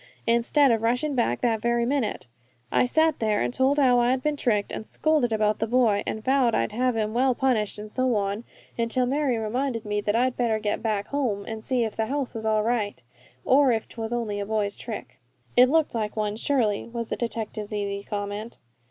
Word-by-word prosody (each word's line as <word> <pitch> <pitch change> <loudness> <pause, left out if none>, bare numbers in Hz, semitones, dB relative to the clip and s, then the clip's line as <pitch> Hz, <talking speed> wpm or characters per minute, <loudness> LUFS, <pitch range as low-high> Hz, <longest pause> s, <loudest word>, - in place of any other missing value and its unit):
Instead 235 +4 +3
of 225 -1 +1
rushin' 250 +6 0
back 240 -3 0
that 225 -3 +1
very 235 0 +1
minute, 250 - -1 0.5
I - - +3
sat 315 +3 +2
there 215 -2 +1
and 120 0 -1
told 270 +2 +2
how 255 -4 +5
I 240 0 +3
had 255 0 0
been 300 -1 +1
tricked, 215 -7 0
and - - -5
scolded 305 -7 +1
about 215 -1 +1
that 225 - -1
boy, 230 -5 +3
an' 220 - -3
vowed 260 -1 +2
I'd 115 - 0
have 250 +2 0
him 215 -1 -1
well 255 +1 +2
punished, 235 -7 0
and 210 +1 -7
so 255 +2 0
on, 200 +2 -1 0.4
until 235 +2 +1
Mary 270 -1 0
reminded 230 +1 -2
me 210 0 -1
that 205 +1 0
I'd 250 +2 +2
better 230 -3 +1
get 210 -1 -2
back 215 -3 -1
home 235 -9 -1
and 220 -1 -6
see 250 -1 +1
if 220 -2 -3
the 220 0 -1
house 275 0 -2
was 220 -1 -4
all 215 -1 +2
right, 220 - -1 0.4
or 270 0 +5
if 225 -2 -1
'twas 225 0 -6
only 225 -4 -2
a 200 - -2
boy's 210 -2 -1
trick." - - -8 0.4
"It 250 +1 +7
looked 315 +1 +2
like 215 -2 -2
one, 210 -1 -1
surely," 225 -4 0
was 235 -1 -5
the - - -1
detective's 220 -2 -4
easy 200 -1 -3
comment. 205 +2 -5
230 Hz, 215 wpm, -25 LUFS, 215-255 Hz, 0.5 s, It